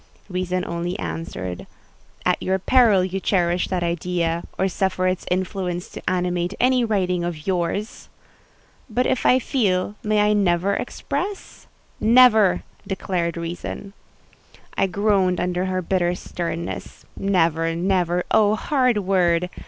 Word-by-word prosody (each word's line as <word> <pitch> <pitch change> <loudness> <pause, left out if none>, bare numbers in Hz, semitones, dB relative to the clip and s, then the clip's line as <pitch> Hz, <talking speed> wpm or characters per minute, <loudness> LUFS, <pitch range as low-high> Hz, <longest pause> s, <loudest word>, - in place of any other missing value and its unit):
Reason 185 0 -2
only 170 +2 -3
answered, 95 - -5 0.6
"At - - +2
your 190 +1 +1
peril 210 -2 +4
you 190 +1 -3
cherish 175 -2 +1
that 180 -2 -1
idea, 170 0 -1
or 190 - +2
suffer 185 0 -1
its 185 0 -1
influence 180 -1 -2
to - - -9
animate 180 +1 -1
any 255 0 +3
writing 185 -5 0
of 165 -3 -4
yours!" 190 +3 -2 0.8
"But 245 +3 0
if - - +1
I 255 - +6
feel, 205 -8 0
may 210 0 +2
I 210 0 +3
never 195 -1 +2
express?" 395 - -4 0.3
"Never!" 220 -4 +5 0.2
declared 175 -3 -2
Reason. 175 +4 -6 0.8
I 195 - +2
groaned 190 -2 +1
under 180 +1 -1
her 185 -1 -1
bitter 175 0 +1
sternness. 170 -1 -5
Never—never—oh, 180 +3 +1
hard 255 -2 +1
word! 180 -3 +1
185 Hz, 120 wpm, -22 LUFS, 175-205 Hz, 0.8 s, I